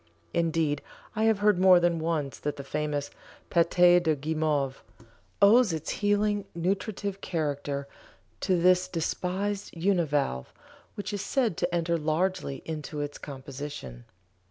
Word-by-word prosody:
Indeed 160 -3 +1 0.3
I 220 +1 +1
have 220 -2 +4
heard 210 -4 +5
more 185 -1 +7
than 175 -1 +1
once 155 -4 -2
that 150 -1 -3
the 140 - -7
famous 145 0 -2 0.4
"Pâte 175 +1 +5
de 160 -3 +2
Guimauve" 150 -2 -1 0.6
owes 220 +1 +6
its 160 -1 -3
healing 205 0 +2
nutritive 195 +2 -2
character 145 -4 -2 0.5
to 185 -2 +1
this 180 +1 +4
despised 185 +3 -2
univalve, 150 - +1 0.5
which 205 +1 -5
is 205 - -2
said 245 - 0
to 175 - -1
enter 170 -1 0
largely 155 -1 -1
into 155 -1 -5
its 145 0 -4
composition. 135 - -8
170 Hz, 130 wpm, -28 LUFS, 145-185 Hz, 0.6 s, more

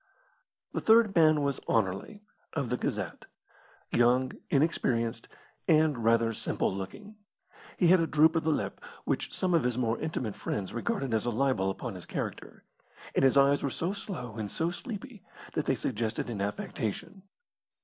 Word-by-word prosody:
The - - -1
third 225 -2 +5
man 155 -3 +5
was 140 -1 0
Anerley, 110 - -1 0.3
of 140 -6 -2
the - - +2
Gazette - - -3 0.7
young, 125 +2 +3 0.2
inexperienced, 120 -6 +1 0.4
and 155 -7 +3
rather 115 0 +3
simple 105 - -1
looking. 200 - -7 0.6
He 175 - +4
had 185 +1 +7
a 165 - +1
droop 155 +2 +4
of 165 - +3
the 160 - +1
lip, 155 - -1 0.2
which - - -1
some 185 -1 0
of 165 - +4
his 125 -1 0
more 115 -2 0
intimate 120 -9 -3
friends 100 -3 -4
regarded 135 - -2
as 110 +1 0
a - - +3
libel 120 -5 +1
upon 110 +4 -4
his 90 -2 -9
character, - - -5 0.5
and - - +2
his 135 +1 +5
eyes 140 +1 +5
were 140 - 0
so 170 +8 -2
slow 125 - -6
and 105 -2 -4
so 165 +1 0
sleepy 225 +2 -7 0.3
that 150 - -1
they 135 - +2
suggested 115 -1 -2
an 105 -4 -3
affectation. 105 - -4
135 Hz, 165 wpm, -29 LUFS, 115-165 Hz, 0.7 s, had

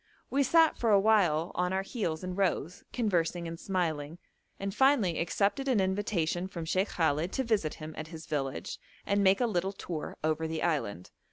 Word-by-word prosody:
We 275 - +2
sat 325 +4 +4
for 230 - +1
awhile 195 -6 +4
on 180 +1 0
our 190 0 0
heels 190 -7 -3
in 185 0 -3
rows, 180 -3 -1
conversing 175 -7 0
and 165 0 -6
smiling, 165 -5 -2 0.4
and 195 0 -3
finally 240 - +3
accepted 200 - 0
an 255 -5 +3
invitation 190 -3 0
from 170 -3 -6
Sheikh 190 +5 +1
Khallet 160 +1 0
to 265 - 0
visit 215 -10 0
him 155 0 -8
at 155 - -6
his 160 0 -9
village, 135 -3 -3 0.3
and 200 0 +2
make 190 0 +5
a 245 - +3
little 195 -3 -1
tour 170 -5 -6
over 155 +1 0
the 160 0 -3
island. 105 - -1
180 Hz, 180 wpm, -30 LUFS, 160-200 Hz, 0.4 s, make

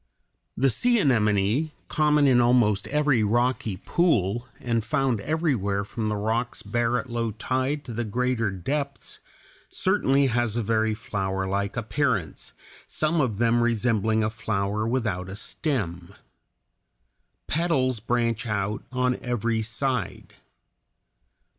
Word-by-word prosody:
The 135 0 +3
sea 240 - +2
anemone, 110 - +2 0.2
common 150 -1 +3
in 125 -3 +5
almost 120 -5 +3
every 145 -4 +2
rocky 115 -2 0
pool, 120 - +1
and 115 -2 -1
found 120 0 0
everywhere 120 - 0
from 110 +1 -3
the 105 - -1
rocks 110 +3 -2
bare 120 0 0
at 130 - -4
low 115 -1 -1
tide 130 +6 -2
to 120 - -6
the 120 +2 -2
greater 120 0 0
depths, 140 - -4 0.5
certainly 140 -8 +2
has 120 -3 0
a 120 - 0
very 110 0 +1
flowerlike 100 -1 -2
appearance, 115 - -1 0.3
some 155 +1 0
of 115 -7 -1
them 120 +1 +3
resembling 110 -2 +1
a 110 - 0
flower 105 -1 -2
without 110 -7 -1
a 95 - -6
stem. 100 - -3 1.3
Petals 135 -7 +1
branch 120 0 -1
out 105 0 -2
on 125 0 +1
every 115 -2 -1
side. 115 -1 -2
120 Hz, 120 wpm, -25 LUFS, 105-130 Hz, 1.3 s, in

